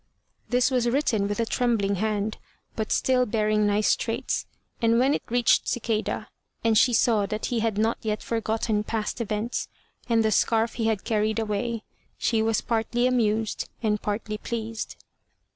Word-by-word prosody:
This 250 +2 +3
was 245 -2 +2
written 235 -6 +1
with 205 +2 -3
a 230 - +2
trembling 225 -5 +1
hand, 215 +1 -1 0.4
but 220 -1 -3
still 250 -1 +2
bearing 215 -1 +2
nice 205 +1 +3
traits, - - -2 0.3
and 230 0 +4
when 265 +4 +3
it - - -1
reached 240 0 +3
Cicada, 225 -2 -1 0.4
and 225 -1 +3
she 245 +3 +5
saw 220 -3 +3
that 215 0 -3
he 235 - +1
had 220 -2 0
not 220 +2 +1
yet 215 -1 -2
forgotten 220 -1 -1
past 220 +2 -3
events, 215 +2 -2 0.4
and 225 -1 +3
the 220 - +2
scarf 225 +2 +2
he 225 -2 -1
had 220 -3 0
carried 215 -1 0
away, 220 +1 -2 0.3
she 225 -2 +1
was 220 -1 +1
partly 235 +1 0
amused 225 -3 0
and 210 -2 +1
partly 210 0 -3
pleased. 225 -1 -4
225 Hz, 160 wpm, -26 LUFS, 215-235 Hz, 0.4 s, she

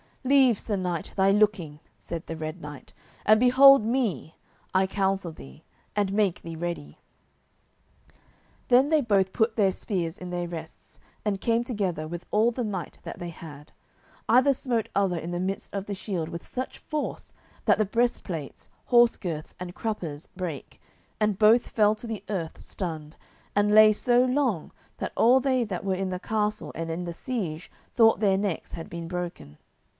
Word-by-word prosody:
"Leave, 260 -4 +4
Sir 210 - -2
Knight, 180 -3 -3
thy 195 0 +4
looking," 195 -8 +1 0.2
said 170 -1 -6
the 165 - -5
Red 160 +2 -6
Knight, 145 -2 -10 0.3
"and 215 +1 +6
behold 265 +1 +7
me, 220 - -1 0.4
I 190 0 +4
counsel 195 -2 -1
thee, 70 - -13 0.3
and 200 -2 0
make 200 -4 +1
thee 165 -1 -7
ready." 165 - -5 1.7
Then 255 +3 +5
they 315 -1 +4
both 195 -6 +2
put 220 0 +1
their 200 -4 +3
spears 180 -3 -3
in 180 - -7
their 175 0 -3
rests, 160 -2 -10 0.3
and 200 -2 -1
came 230 0 +2
together 190 -10 -2
with 175 +2 -7
all 220 +3 +3
the 245 +1 -3
might 195 -5 -5
that - - -7
they 175 - -6
had. 150 -3 -11 0.6
Either 255 +4 +5
smote 240 -4 -2
other 195 -3 +2
in 165 +1 -5
the 175 - -2
midst 190 +2 -3
of 200 -1 -3
the 205 - -4
shield 185 -5 -4
with 170 - -8
such 255 +1 -5
force 305 -2 -5 0.3
that - - +4
the 215 - +3
breastplates, 195 - -2 0.2
horse 240 -1 +5
girths, 160 -5 -5
and 180 -1 -7
cruppers 170 -9 -4
brake, 175 -7 -6 0.4
and 210 -3 +1
both 225 +3 +5
fell 210 -1 +3
to 225 +2 -9
the 220 -2 -5
earth 175 -6 -3
stunned, 160 -4 -6 0.4
and 205 +1 +3
lay 215 0 +8
so 245 +3 +3
long 255 - 0 0.3
that - - -4
all 250 +3 +5
they 260 -2 +1
that 190 -5 -4
were 190 -1 +1
in 190 0 -2
the 180 -1 -3
castle 210 +1 -2
and 165 0 -4
in 175 +2 -3
the 170 - -4
siege 180 - -4 0.2
thought 225 -2 +5
their 195 -3 +3
necks 195 -4 -3
had 165 - -6
been 170 -1 -6
broken. 170 - -6
195 Hz, 175 wpm, -26 LUFS, 170-225 Hz, 1.7 s, lay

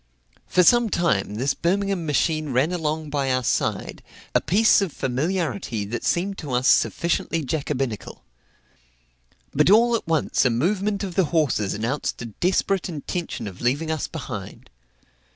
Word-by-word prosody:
For 180 - +3
some 240 +4 +5
time 105 - 0
this 130 +6 0
Birmingham 195 -1 -1
machine 155 +1 0
ran 135 +6 +1
along 155 -3 -2
by 140 -2 0
our 130 0 +1
side - - -1 0.3
a - - +3
piece 205 +7 +4
of 195 -4 -1
familiarity 140 - -2
that 115 +4 -5
seemed 195 +3 0
to 145 -5 -5
us 125 +2 +1
sufficiently 165 -1 +1
jacobinical. 135 -6 -3 1.3
But 150 +4 +3
all 235 +4 +5
at 225 - -4
once 160 -2 +1
a 125 - +4
movement 195 - 0
of 190 -3 -4
the 190 0 +2
horses 145 - 0
announced 120 +7 -2
a 115 - -5
desperate 180 - 0
intention 170 - -4
of 95 -3 -9
leaving 145 +7 0
us 160 -3 -2
behind. - - -8
155 Hz, 150 wpm, -23 LUFS, 130-185 Hz, 1.3 s, some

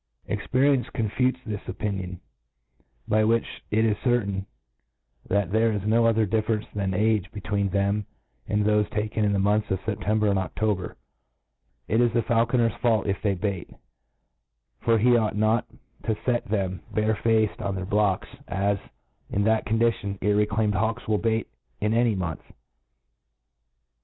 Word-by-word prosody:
Experience 130 -1 +1
con 110 -2 0
futes 130 +2 +1
this 105 -2 -4
opinion, 95 -2 -4 0.9
by 110 +1 +3
whieh 115 +2 +2 0.2
it 110 +1 +2
iS 105 -2 +1
Certain, 100 -6 0 0.8
that 100 -2 +1
there 110 +1 +3
is 105 -2 -3
no 115 +2 +4
other 115 -1 +3
differ 110 +2 +1
enee 105 - -11
than 100 -2 -1
age 105 -1 +1
between 100 -1 -1
them 100 +1 0 0.4
and 105 0 +1
thofe 105 -1 +2
taken 110 +1 -1
in 105 - +2
the 100 - +1
months 105 +2 +1
of 95 - 0
September 105 0 0
and 100 -1 +2
Oc 95 -4 -5
tober, 105 -5 -1 0.9
It 110 +3 +2
is 120 -1 +3
the 115 -1 +2
faulconer's 115 -1 +2
fault 115 -4 +2
if 100 -2 -1
they 100 -2 +1
beat; 95 -1 -3 1.1
fof 115 -1 +3
he 120 +1 +5
ought 110 -3 0
not 110 +2 +2 0.4
to 110 - +1
fet 120 +2 -1
thcni 95 -4 -1
bare 110 0 +1
faced 110 0 +1
on 100 -1 -2
their 95 -1 -4
biodes^ 100 -1 +1 0.2
is^ 100 0 0 0.5
in 100 - 0
that 110 +1 +2
oon^itionj 110 -3 +1
irreclatmed 105 +1 +2
hawks 110 +3 -1
will 105 -1 +2
bek^'ift 110 0 0 0.3
a^y 110 0 +2
mantfe. 85 -4 -5
105 Hz, 155 wpm, -25 LUFS, 100-115 Hz, 1.1 s, he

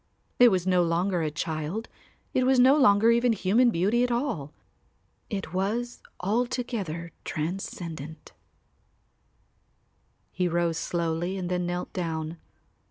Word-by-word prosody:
It 245 -1 +9
was 185 -4 0
no 185 -1 +3
longer 175 +2 +1
a 155 - 0
child, 160 +7 -3 0.5
it 255 - +2
was 260 0 +4
no 260 +3 +7
longer 225 -5 +5
even 235 0 +3
human 220 +5 +3
beauty 210 +6 +2
at 250 - +1
all. 235 - -2 0.8
It 195 -6 -4
was 225 +6 -2 0.2
altogether 210 -6 -2
transcendent. 160 -2 -5 2.0
He 180 -1 0
rose 170 -1 0
slowly 170 +2 -2
and 180 -2 -3
then 180 -1 0
knelt 175 0 -4
down. 165 -2 -3
185 Hz, 120 wpm, -27 LUFS, 165-235 Hz, 2.0 s, It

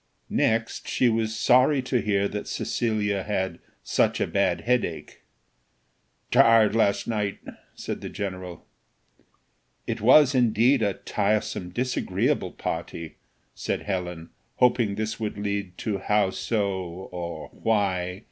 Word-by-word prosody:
Next, 115 +1 0
she 125 - +2
was 110 -1 0
sorry 130 +4 +4
to 125 -2 0
hear 100 -1 +1
that 105 0 -5
Cecilia 105 -4 -1
had 95 -1 -2 0.2
"such - - +1
a - - +2
bad - - 0
headache." 120 -9 -2 1.1
"Tired 115 -2 +5
last 100 -3 +2
night," 105 -3 -1 0.4
said - - -5
the - - -6
general. 90 -3 -6 1.2
"It 115 -1 -3
was, 135 +4 +6
indeed, 125 +1 +3
a 100 -3 +1
tiresome, 105 -4 -1
disagreeable 125 +7 -1
party," 80 -1 -5 0.4
said - - -3
Helen, 90 -4 -4 0.2
hoping 120 -4 +2
this 110 +1 -3
would 110 -2 -3
lead 100 -3 -3
to 105 -3 -2
how 105 0 +2
so? 100 0 -1 0.4
or 85 -1 -6
why? 95 -4 -1
105 Hz, 120 wpm, -25 LUFS, 95-115 Hz, 1.2 s, was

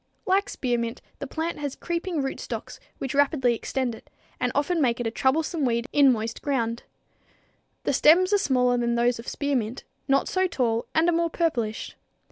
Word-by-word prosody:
_ - - -45 0.2
Like 385 +2 +2
spearmint, 240 -2 -2 0.2
the 280 - -5
plant 320 +4 -3
has 285 -2 -3
creeping 340 -3 -2
rootstocks, 270 - -5 0.2
which 270 - -4
rapidly 275 -3 +3
extend 250 +1 -2
it, 225 - -13 0.3
and 250 - 0
often 315 +4 +1
make 245 -3 +2
it 240 - -2
a 225 - 0
troublesome 305 +6 0
weed 235 -2 +1
in 280 -2 +6
moist 225 -1 -3
ground. 235 -5 -1 1.0
The - - 0
stems 365 +6 +5
are 410 - +5
smaller 250 -7 +2
than 235 0 0
those 235 0 +2
of 230 - -10
spearmint, 260 -5 -2 0.2
not 275 0 +2
so 375 0 +1
tall, 235 -8 -1
and 320 +2 +4
are 345 - +3
more 335 0 +1
purplish. 245 -11 -2
265 Hz, 180 wpm, -25 LUFS, 235-320 Hz, 1.0 s, in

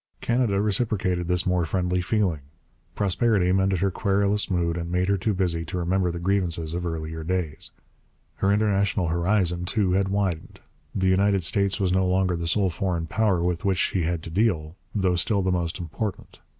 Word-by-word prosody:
Canada 115 -5 +1
reciprocated 100 -4 0
this 90 0 0
more 90 -1 +1
friendly 90 +2 0
feeling. 90 -4 0 0.6
Prosperity 100 -1 +2
mended 95 -1 +1
her 100 0 +2
querulous 100 +1 +1
mood 85 -3 0
and 85 0 -4
made 90 +1 +1
her 100 - +3
too 100 +3 -1
busy 85 -3 0
to 85 +3 -5
remember 90 +1 0
the 85 - -5
grievances 85 -3 0
of 90 0 -2
earlier 80 -1 -4
days. 85 -3 -2 0.7
Her 95 - +2
international 100 -3 +1
horizon, 90 0 +1
too, 95 0 +1
had 95 +1 +2
widened; 95 -4 -2 0.4
the 95 -1 +1
United 95 0 +3
States 100 +3 +1
was 95 -2 +1
no 95 0 +2
longer 90 -1 +1
the 85 0 -3
sole 95 +1 +2
foreign 85 -2 -2
power 95 -1 +1
with 90 0 -1
which 95 -2 +1
she 95 0 +1
had 85 0 -2
to 80 - -8
deal, 80 -5 0 0.2
though 95 -3 +2
still 95 +3 +2
the 95 - +1
most 85 -2 -1
important. 95 +4 -5
90 Hz, 180 wpm, -25 LUFS, 85-100 Hz, 0.7 s, her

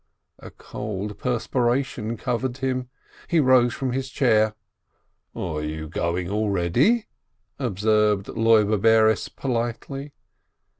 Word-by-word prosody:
A - - -10
cold 105 -1 -6
perspiration 120 -1 -1
covered 125 +2 -2
him. 130 -1 -2 0.4
He 170 - +2
rose 130 -4 +4
from 130 -2 -2
his 135 +1 -3
chair. 110 -5 +2 0.8
"You 80 -2 -4
are - - -8
going 85 +2 -2
already?" 105 - +1 0.5
observed 105 -3 +1
Loibe 110 -2 +3
Bares, 110 -1 +4
politely. 135 +3 -4
115 Hz, 100 wpm, -24 LUFS, 105-130 Hz, 0.8 s, rose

